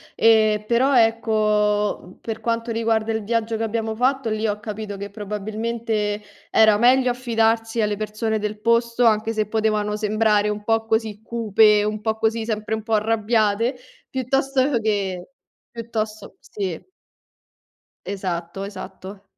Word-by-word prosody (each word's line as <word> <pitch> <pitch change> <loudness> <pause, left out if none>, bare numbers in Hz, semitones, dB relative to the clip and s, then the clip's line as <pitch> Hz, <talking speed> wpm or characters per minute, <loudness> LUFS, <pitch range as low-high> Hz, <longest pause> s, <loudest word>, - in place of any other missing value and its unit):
ehm, 215 -2 +4
però, 260 +3 +3
ecco, 215 -2 +2
uhm, 180 - -15
per 225 -1 -5
quanto 230 0 -2
riguarda 225 -1 0
il 220 -2 -3
viaggio 230 0 -1
che 225 - -2
abbiamo 225 0 -2
fatto, 255 +1 0
lì 215 +1 -1
ho 210 0 -1
capito 210 -1 -5
che 200 +1 -6
probabilmente 210 +1 -3 0.3
era 215 -1 +5
meglio 250 +2 +4
affidarsi 225 -2 0
alle 210 -1 0
persone 215 +1 -2
del 210 0 -3
posto, 235 +1 +2
anche 220 0 +3
se 215 -2 -1
potevano 215 -1 0
sembrare 210 -1 +2
un 210 0 -3
po' 225 +1 +1
così 220 -2 -1
cupe, 215 -2 +3
un 215 0 -2
po' 220 +1 -1
così, 220 0 0
sempre 215 -1 -3
un 220 - -6
po' 225 0 -3
arrabbiate, 220 +2 +1 0.3
piuttosto 265 +1 +1
che 200 -2 -2 0.4
piuttosto 220 -2 -5
sì. 190 -5 -5 1.2
Esatto 185 -1 -4
esatto. 195 0 -9
220 Hz, 140 wpm, -22 LUFS, 210-230 Hz, 1.2 s, era